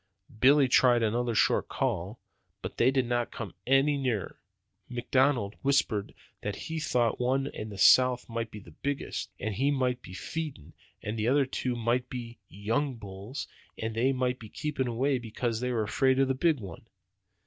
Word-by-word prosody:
Billy 140 +2 +6
tried 120 -1 +5
another 120 +1 0
short - - +2
call, 95 +7 -2 0.4
but - - -6
they 120 - +5
did 130 -1 +1
not 120 0 0
come 105 -6 -7
any 135 +2 +4
nearer. 125 -7 -2 0.5
McDonald 125 -3 +1
whispered 135 -7 +1 0.3
that 105 -1 -3
he 160 0 -5
thought 120 -6 +1
the - - 0
one 135 +2 +1
in 110 -6 -6
the 100 - -8
south 125 +4 +6
end 115 - -12
might 115 0 -2
be 105 - -10
the 90 -5 -12
biggest, 140 - -4
and 110 +1 -2
he 135 +8 +1
might 130 -3 0
be 90 - -11
feeding, 140 - -6 0.3
and 110 +2 -3
the 110 - 0 0.2
two 130 -1 -2
others 120 -2 -6
might 125 +2 +1
be 120 -2 -7
young 120 +7 -1
bulls, 100 +4 -7 0.3
and 110 0 -3
they 120 +4 +2
might 125 -1 -1
be 110 - -10
keeping 145 -1 -2
away 130 +3 +1
because 115 0 -3
they 125 +1 -1
were 115 -3 0
afraid 130 +5 +2
of 135 0 +3
the 135 - +1
big 155 +2 +2
one. 100 +1 -9
125 Hz, 185 wpm, -29 LUFS, 110-135 Hz, 0.5 s, Billy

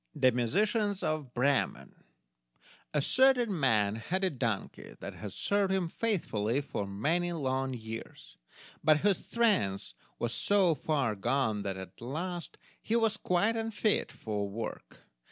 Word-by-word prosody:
The 130 - +4
Musicians 200 - +1
of 155 -5 -2
Bremen 135 +2 +1 1.0
A 150 -2 +1
certain 250 - +4
man 110 -6 +2
had 185 +12 -2
a 190 - +2
donkey 115 -7 -3
that - - -6
had 105 -2 -7
served 200 - +1
him 190 -3 +1
faithfully 140 - 0
for 105 -7 -4
many 160 - 0
long 135 -4 -1
years, 110 - -8 0.5
but 155 0 +6
whose 200 -2 +2
strength 205 - +1 0.2
was 120 0 -1
so 195 -4 +4
far 140 -7 0
gone 110 0 0
that 100 -1 -3
at 95 +1 -10
last 170 +8 -4 0.2
he 225 - -1
was 225 -2 +3
quite 205 +4 +1
unfit 225 -1 0
for 105 -2 -3
work. 115 +3 -7
145 Hz, 135 wpm, -31 LUFS, -, 1.0 s, but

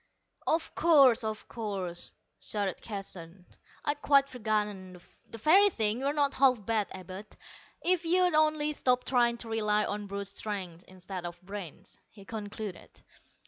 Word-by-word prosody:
"Of 325 +1 0
course, 275 -8 +5
of 220 -1 -4
course," 195 -6 -5 0.3
shouted 205 -3 -3
Keston, 185 -4 -7 0.4
"I'd 290 0 -1
quite 275 -1 +5
forgotten. 210 -6 -3 0.3
The 230 - -8
very 370 - +6
thing. 220 - +1
You're 275 +2 0
not 285 -2 +1
half 255 -6 +3
bad, 220 -3 +1
Abud, 190 +2 -8 0.6
if 360 -1 +2
you'd 360 +1 +3
only 305 -1 +3
stop 250 -3 +1
trying 240 -2 +2
to 235 - -7
rely 210 -1 +1
on 205 0 -4
brute 200 0 -4
strength 190 -4 -3
instead 185 0 -8
of 175 0 -7
brains," 195 -2 -9
he 200 -2 -15
concluded. 210 -3 -7
215 Hz, 140 wpm, -30 LUFS, 195-270 Hz, 0.6 s, very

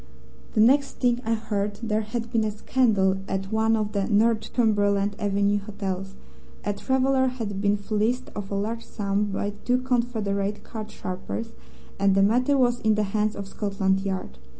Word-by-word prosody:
The 215 - +3
next 275 +5 +4
thing 245 -1 +1
I 225 -1 +1
heard 205 -2 -2
there 215 -1 +1
had 230 +2 -4
been 230 -3 +2
a 215 - +1
scandal 210 -3 +2
at 195 0 -3
one 220 +1 +3
of 210 -1 -1
the 200 -2 -1
Northumberland 205 -2 +2
Avenue 205 0 +1
hotels: 195 -2 -5 0.5
a 205 - +1
traveller 265 +3 +2
had 220 -6 -3
been 205 0 +2
fleeced 215 +4 -1
of 205 -1 -5
a 200 - -2
large 225 +3 -2
sum 200 0 -1
by 205 0 -2
two 250 0 +2
confederate 220 -5 -1
card 220 -2 -7
sharpers, 215 +3 -5 0.5
and 195 -1 +4
the 195 - +5
matter 250 +7 +3
was 245 -2 +3
in 220 -1 +2
the 210 - +1
hands 215 0 +1
of 200 -1 -6
Scotland 195 -1 0
Yard. 190 - -4
210 Hz, 170 wpm, -25 LUFS, 200-230 Hz, 0.5 s, the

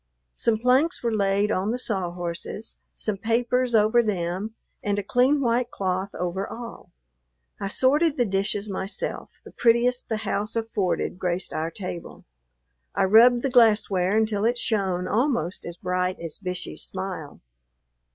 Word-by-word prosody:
Some 230 -2 +1
planks 255 +9 +2
were 235 -1 0
laid 200 0 +1
on 190 +1 0
the 240 - 0
saw 195 -8 -1
horses, 175 +5 -5 0.2
some 215 -2 -2
papers 240 +3 +1
over 220 +3 +5
them, 195 0 -2 0.3
and 205 -1 -1
a 205 - -1
clean 255 +7 +3
white 240 -1 +1
cloth 190 -2 -2
over 180 +2 -2
all. 235 0 -9 0.7
I 200 - -2
sorted 290 +8 +2
the 245 - +3
dishes 200 +1 -1
myself; 200 - -3 0.2
the - - -11
prettiest 240 +1 +2
the 220 - 0
house 210 0 -2
afforded 210 -5 -1
graced 180 0 -2
our 160 +1 -1
table. 175 -1 -7 0.7
I - - +2
rubbed 235 +5 +6
the 275 - 0
glassware 210 -5 +4
until 215 -2 +1
it 240 +2 +2
shone 190 -6 0
almost 220 - 0
as 170 0 -7
bright 180 +1 -1
as 165 -2 -6
Bishey's 180 -2 -5
smile. 185 -6 -5
210 Hz, 150 wpm, -25 LUFS, 185-235 Hz, 0.7 s, rubbed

